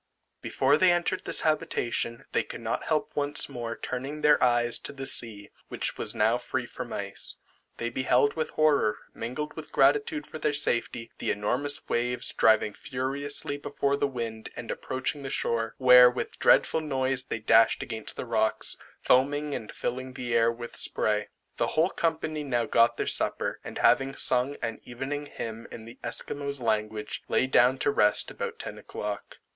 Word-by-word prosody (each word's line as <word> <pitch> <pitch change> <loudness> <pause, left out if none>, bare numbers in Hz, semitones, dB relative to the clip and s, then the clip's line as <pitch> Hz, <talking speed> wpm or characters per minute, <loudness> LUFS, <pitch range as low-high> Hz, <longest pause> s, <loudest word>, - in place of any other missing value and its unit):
Before 140 +3 +2
they 185 +1 +5
entered 175 +2 0
this - - +3
habitation, 155 -7 -1
they - - +2
could - - -8
not 115 0 -3
help 155 -2 0
once 145 0 +1
more 115 -1 -5
turning 135 +4 -5
their 150 -1 +4
eyes 120 -1 +3
to - - -3
the 135 -1 -7
sea, 110 -6 +1 0.2
which - - -3
was - - 0
now - - +2
free - - -3
from - - -8
ice. - - -3 0.4
They 115 0 -3
beheld 130 +2 +2
with 160 -1 -2
horror, 145 -9 +2 0.2
mingled 130 +6 -5
with 155 -1 -9
gratitude 145 +2 +2
for 155 - -9
their 150 -1 0
safety, 120 -4 +1
the - - -2
enormous 140 +8 0
waves 125 +1 0
driving 110 -1 +3
furiously 140 +4 -3
before 140 0 -1
the 145 - 0
wind 115 -4 -5
and 120 - -6
approaching 130 +3 -3
the 135 - -5
shore, 115 -3 -1
where 125 -1 +8
with 125 - -5
dreadful 160 - +4
noise 135 -3 -1
they - - -3
dashed 115 +1 +4
against 110 -1 -4
the - - -5
rocks, 110 -2 0 0.3
foaming 145 +3 +2
and 110 - -5
filling 130 +1 -4
the 120 -2 -4
air 115 0 +4
with 120 0 -9
spray. 105 -1 -1 0.3
The - - +1
whole 165 +4 +3
company 155 -2 -1
now 120 -4 0
got 115 +1 +3
their - - -1
supper, - - -1
and - - -7
having 135 0 +3
sung 130 +3 +3
an 115 -1 -3
evening 135 +4 -5
hymn 115 -4 -7
in 110 - -9
the 115 - -12
Esquimaux 140 +3 -3
language, 110 -2 -2
lay - - +2
down 130 0 +4
to 145 - +1
rest 105 -6 +2
about - - -5
ten - - -6
o'clock. 105 -1 -6
130 Hz, 175 wpm, -27 LUFS, 115-145 Hz, 0.4 s, where